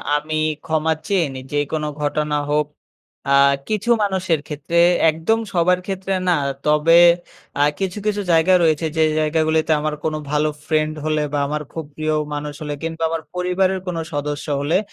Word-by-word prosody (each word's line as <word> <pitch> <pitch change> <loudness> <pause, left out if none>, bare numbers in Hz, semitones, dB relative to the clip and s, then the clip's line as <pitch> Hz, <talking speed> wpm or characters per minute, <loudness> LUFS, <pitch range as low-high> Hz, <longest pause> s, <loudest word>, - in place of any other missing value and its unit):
আমি 155 +1 -2 0.3
ক্ষমা 160 0 +1
চেয়ে 190 -4 +2
নেই, 130 0 -7
যে 145 - -1
কোনও 155 -1 -1
ঘটনা 150 +1 -1 0.2
হোক। 150 0 +2 0.7
আ - - +6 0.3
কিছু 215 +1 -2
মানুষের 185 -5 0
ক্ষেত্রে, 155 +3 -1 0.3
একদম 165 +8 0
সবার 180 +1 +3
ক্ষেত্রে 195 0 -3 0.2
না। - - +5 0.3
তবে 150 +3 +5 0.6
আ - - +6 0.2
কিছু, 190 0 -2
কিছু 210 -1 0
জায়গা 165 +3 +4
রয়েছে 160 0 +2
যে 160 - +4 0.2
জায়গাগুলিতে 155 +1 +1
আমার 150 0 -2
কোনো 155 -1 -1
ভালো 150 +1 +2 0.2
ফ্রেন্ড 155 0 0
হলে 155 -1 +1
বা 145 - +1
আমার 150 +1 -2
খুব 160 -2 -5
প্রিয় 155 0 -1 0.2
মানুষ 145 0 -4
হলে 150 -1 -3
কিংবা 165 0 -3
আমার 165 0 -2
পরিবারের 185 +1 +1
কোনো 170 -2 -2
সদস্য 145 +1 -3
হলে 160 +5 +2
160 Hz, 165 wpm, -20 LUFS, 150-180 Hz, 0.7 s, আ